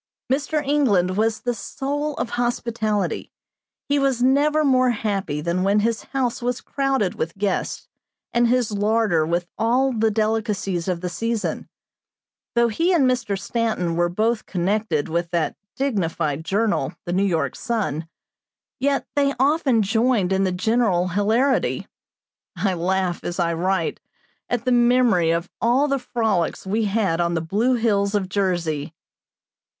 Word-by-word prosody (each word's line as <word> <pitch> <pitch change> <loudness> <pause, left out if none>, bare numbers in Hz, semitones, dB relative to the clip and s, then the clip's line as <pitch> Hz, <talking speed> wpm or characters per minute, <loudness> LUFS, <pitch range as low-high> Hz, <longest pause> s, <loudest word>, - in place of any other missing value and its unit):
Mr. 295 +2 -1
England 205 -11 +2
was 220 +1 0
the 245 - -1
soul 290 +5 -3
of 235 - -3
hospitality. 230 -5 -1 0.6
He 285 0 +2
was 270 -3 +1
never 295 +4 +3
more 255 -2 +4
happy 200 -9 -2
than 170 +3 -1
when 200 +2 +3
his 230 +1 -1
house 255 -3 -2
was 245 0 -1
crowded 270 -8 -1
with 165 +4 -4
guests, 195 -2 -2 0.5
and 240 0 +3
his 245 -2 +1
larder 205 -6 +1
with 170 +1 0
all 255 +4 +2
the 225 -1 +2
delicacies 210 -4 -1
of 180 -2 -1
the 180 - -2
season. 230 +3 -3 0.9
Though 235 0 +4
he 330 - +1
and 290 -7 +4
Mr. 245 -6 0
Stanton 215 -7 -1
were 175 0 +2
both 220 +5 0
connected 185 -3 0
with 170 +1 -1
that 170 -2 -1 0.2
dignified 165 - -1
journal, 195 -5 0
the 175 - -2
New 190 - +2
York 175 -5 0
Sun, 195 -10 -2 0.7
yet 275 +1 +1
they 280 -1 +2
often 270 -5 +3
joined 220 -2 +2
in 190 0 +2
the 185 - 0
general 195 -2 +1
hilarity. 220 +9 +1 0.7
I 195 -2 +1
laugh, 180 +1 -1
as 175 +1 -4
I 170 -1 +1
write, 180 0 -1 0.5
at 245 -1 -1
the 255 - +2
memory 240 -8 +4
of 170 +2 0
all 250 +5 +3
the 275 -1 0
frolics 220 -10 -1
we 215 +3 0
had 195 -5 +1
on 170 0 0
the - - +1
blue 215 +10 +1
hills 205 -3 +1
of 190 -3 -1
Jersey. 170 -6 -1
215 Hz, 150 wpm, -22 LUFS, 180-245 Hz, 0.9 s, more